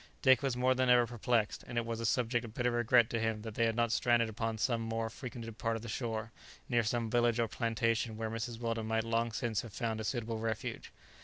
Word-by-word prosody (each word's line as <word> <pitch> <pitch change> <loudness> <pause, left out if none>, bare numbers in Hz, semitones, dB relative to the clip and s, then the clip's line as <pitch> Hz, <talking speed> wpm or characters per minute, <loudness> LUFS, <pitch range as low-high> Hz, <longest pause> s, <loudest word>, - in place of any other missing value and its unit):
Dick 130 -1 +6
was 135 -3 -1
more 130 +1 +3
than 130 0 +1
ever 120 -1 +6
perplexed, 120 -2 0
and 120 - -5
it 120 - +1
was 115 -1 -3
a 115 - 0
subject 120 0 +1
of 115 -1 -9
bitter 125 0 +1
regret 120 0 +4
to 115 - 0
him 110 -1 -1
that 110 -1 -6
they 115 +1 +2
had 115 - -1
not 115 -1 +1
stranded 120 -1 +3
upon 115 0 -2
some 115 +1 +1
more 115 0 -2
frequented 115 -3 -8
part 115 -1 0
of 115 - -6
the - - -6
shore, 110 -1 -3 0.4
near 120 -2 +3
some 115 +1 -1
village 120 -1 +3
or 115 - +2
plantation 115 0 0
where 110 0 -3
Mrs. 115 0 -4
Weldon 115 -2 -2
might 110 0 +1
long 115 +1 0
since 110 0 -1
have 115 -4 -10
found 110 -2 -2
a - - -4
suitable 115 -1 -2
refuge. 110 -1 -4
115 Hz, 240 wpm, -33 LUFS, 110-120 Hz, 0.4 s, Dick